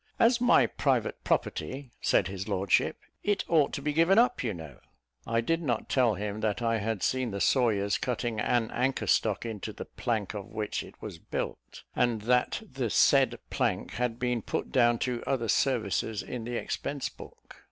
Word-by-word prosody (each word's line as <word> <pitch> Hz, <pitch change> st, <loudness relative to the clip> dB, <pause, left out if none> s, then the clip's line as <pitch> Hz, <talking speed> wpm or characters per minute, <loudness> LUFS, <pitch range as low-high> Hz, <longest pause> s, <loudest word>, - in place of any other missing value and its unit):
"As 235 Hz, +1 st, +4 dB
my 245 Hz, 0 st, +5 dB
private -, -, 0 dB
property," 135 Hz, -1 st, -2 dB
said -, -, +3 dB
his 95 Hz, +1 st, -5 dB
lordship, 95 Hz, -2 st, +1 dB, 0.2 s
"it 205 Hz, -1 st, 0 dB
ought 155 Hz, -4 st, +3 dB
to 140 Hz, -, -4 dB
be 150 Hz, 0 st, 0 dB
given 165 Hz, +6 st, +4 dB
up, 245 Hz, -, +3 dB
you 115 Hz, -, 0 dB
know." 80 Hz, -8 st, -9 dB, 0.5 s
I 115 Hz, 0 st, +1 dB
did 165 Hz, +8 st, 0 dB
not 120 Hz, -8 st, -2 dB
tell 120 Hz, -5 st, +3 dB
him 105 Hz, +2 st, -4 dB
that 110 Hz, 0 st, 0 dB
I 115 Hz, -1 st, +1 dB
had 110 Hz, -1 st, -2 dB
seen 130 Hz, -2 st, +1 dB
the 100 Hz, -1 st, -4 dB
sawyers 100 Hz, -6 st, +2 dB
cutting 120 Hz, -3 st, -2 dB
an 115 Hz, +1 st, +1 dB
anchor 130 Hz, +2 st, 0 dB
stock 110 Hz, 0 st, +1 dB
into 110 Hz, -3 st, -5 dB
the -, -, -8 dB
plank 110 Hz, -5 st, -2 dB
of 105 Hz, 0 st, -6 dB
which 110 Hz, -2 st, -3 dB
it -, -, -13 dB
was -, -, -7 dB
built, -, -, -6 dB
and 115 Hz, -3 st, +1 dB
that 125 Hz, +2 st, +1 dB
the -, -, -3 dB
said -, -, +4 dB
plank -, -, -1 dB
had 120 Hz, -1 st, -2 dB
been 125 Hz, -1 st, -1 dB
put -, -, -3 dB
down 120 Hz, -2 st, +4 dB
to 125 Hz, -2 st, -2 dB
other 120 Hz, -4 st, 0 dB
services 110 Hz, -3 st, 0 dB
in 120 Hz, -3 st, -6 dB
the 120 Hz, 0 st, -4 dB
expense 140 Hz, +3 st, -3 dB
book. -, -, -13 dB
120 Hz, 185 wpm, -29 LUFS, 105-130 Hz, 0.5 s, my